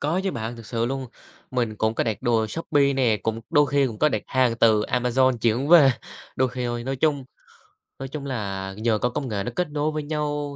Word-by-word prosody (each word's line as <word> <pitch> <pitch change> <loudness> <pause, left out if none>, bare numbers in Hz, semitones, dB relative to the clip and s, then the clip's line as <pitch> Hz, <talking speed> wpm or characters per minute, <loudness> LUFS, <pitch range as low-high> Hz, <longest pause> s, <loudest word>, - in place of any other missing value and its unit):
có 160 +6 0
chứ 195 - +1
bạn, 115 -2 -5
thực 115 -2 -11
sự 115 -1 -1
luôn. 135 +1 -3 0.4
Mình 120 -4 -1
cũng 110 +1 0
có - - 0
đặt 110 -3 -3
đồ 115 -2 +2
Shopee 140 +2 +1
nè, 125 -5 +2
cũng 110 0 -2
đôi 145 -3 +4
khi 140 0 +2
cũng 110 -4 -6
có 150 - +4
đặt - - -2
hàng 125 -3 +1
từ 110 -2 +4
Amazon 125 +2 +1
chuyển 120 +5 +1
về, 155 -6 +8 0.5
đôi 130 0 +2
khi 125 0 -4
thôi. 120 0 -3
Nói 135 0 -2
chung 145 -2 +1 0.8
nói 135 - -5
chung 140 +1 -6
là 100 -7 -4
nhờ 110 0 +1
có 125 - 0
công 135 +1 -4
nghệ 100 -2 -2
nó - - -4
kết 180 -4 -1
nối 150 +1 -1
với 155 -1 -3
nhau 145 -1 -3
130 Hz, 235 wpm, -24 LUFS, 115-145 Hz, 0.8 s, về